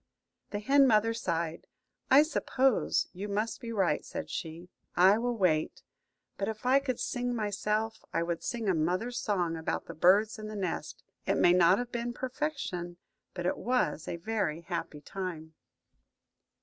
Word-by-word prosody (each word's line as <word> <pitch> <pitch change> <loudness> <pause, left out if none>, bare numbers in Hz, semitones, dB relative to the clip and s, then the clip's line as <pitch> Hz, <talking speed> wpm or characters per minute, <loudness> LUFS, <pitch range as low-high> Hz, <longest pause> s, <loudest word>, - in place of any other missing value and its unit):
The 205 - -3
hen 270 +6 +5
mother 225 -1 +3
sighed. 170 -7 -3 0.4
"I 280 +3 +8
suppose 270 -5 +1
you 195 +3 -5
must 210 +5 -2
be 230 -2 -5
right," 195 -5 +1
said - - -6
she; 165 +2 -5 0.3
"I 190 +4 +6
will 240 0 -1
wait. 160 -6 +1 0.6
But 195 - -1
if 220 +1 -5
I 260 +2 +5
could 260 -3 -3
sing 245 -1 -2
myself, 215 +1 -1
I 165 - 0
would 170 -1 -2
sing 230 -3 -3
a 190 - +4
mother's 185 +10 0
song 180 -7 0
about 160 0 -3
the - - -8
birds 205 +7 +4
in 215 - -6
the 215 - -6
nest. 190 -4 -4 0.2
It - - +2
may 175 - +5
not 180 +1 +5
have 245 0 -4
been 240 0 -3
perfection, 255 - -4 0.4
but 175 -1 -4
it 180 - 0
was 245 -11 0
a - - -3
very 170 -3 -2
happy 170 -3 -5
time." 165 -3 -6
205 Hz, 165 wpm, -30 LUFS, 175-240 Hz, 0.6 s, I